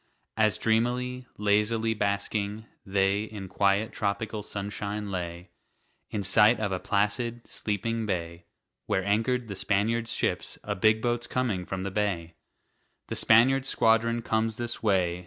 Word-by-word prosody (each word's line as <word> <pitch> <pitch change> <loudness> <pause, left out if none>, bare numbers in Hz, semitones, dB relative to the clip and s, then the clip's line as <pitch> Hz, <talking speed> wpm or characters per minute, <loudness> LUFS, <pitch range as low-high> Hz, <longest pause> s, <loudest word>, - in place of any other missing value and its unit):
As 110 -3 +3
dreamily, 125 +3 0
lazily 105 +2 +2
basking, 105 +1 -2 0.2
they 100 +1 +1
In 105 -3 -8
quiet 100 +3 +1
tropical 105 +1 -2
sunshine 105 0 -4
lay, 85 -1 -5 0.6
In 105 - -3
sight 105 +4 +5
of 105 -3 -1
a 95 - -1
placid, 115 +5 -1
sleeping 110 +2 -2
bay, 85 -3 -3 0.4
Where 95 - 0
anchored 115 +4 +1
the 100 - -5
Spaniard's 110 +4 0
ships, - - -1
"A - - -2
big 110 +2 +3
boat's 120 0 0
coming 110 -9 -1
from 95 -1 -3
the 100 - -3
bay! 95 -5 -1 0.8
The - - -3
Spaniard's 130 +4 +4
squadron 115 +1 +2
comes 110 0 0
this 120 0 -3
way!" 90 -5 +1
105 Hz, 140 wpm, -28 LUFS, 100-115 Hz, 0.8 s, sight